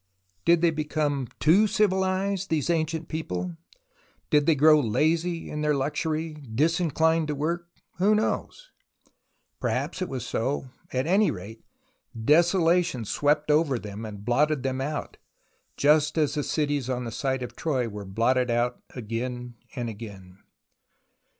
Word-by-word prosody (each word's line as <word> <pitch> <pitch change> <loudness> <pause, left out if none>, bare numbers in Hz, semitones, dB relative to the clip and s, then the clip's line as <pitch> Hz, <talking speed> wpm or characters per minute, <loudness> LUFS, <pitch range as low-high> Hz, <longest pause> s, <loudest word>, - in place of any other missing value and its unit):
Did 170 -1 +5
they 170 -1 +4
become 150 -3 -1
too 190 +8 +5
civilized, 195 -1 +1
these 160 0 +1
ancient 160 0 -1
people? 165 +2 -4 0.7
Did 150 -2 +4
they 165 - +5
grow 155 +2 +6
lazy 165 +8 0
in 150 - -3
their 150 -1 +2
luxury, 155 +2 -2
dis 160 +6 +2
inclined 160 -1 +2
to 150 - -2
work? 170 +4 -2 0.3
Who 205 +3 +4
knows! - - -2 0.9
Perhaps - - -2
it 185 - -2
was 130 -4 -4
so. 130 +2 -2 0.2
At 130 +1 0
any 195 +5 +3
rate, 105 +4 -7 0.6
desolation 170 - +3
swept 150 +6 +1
over 150 -4 +3
them 105 -1 -7
and 105 -2 -8
blotted 140 +3 +2
them 130 0 -1
out, 150 +2 -4 0.6
just 150 +2 +3
as 150 -2 +2
the 150 - -1
cities 145 -3 -1
on 125 -1 -1
the 115 - -5
site 130 +2 -1
of 120 0 -7
Troy 130 -7 -1
were 105 -2 -7
blotted 120 +6 +1
out 120 +1 0
again 120 +1 -4 0.2
and 120 -3 -3
again. 100 -4 -9
150 Hz, 145 wpm, -26 LUFS, 125-165 Hz, 0.9 s, grow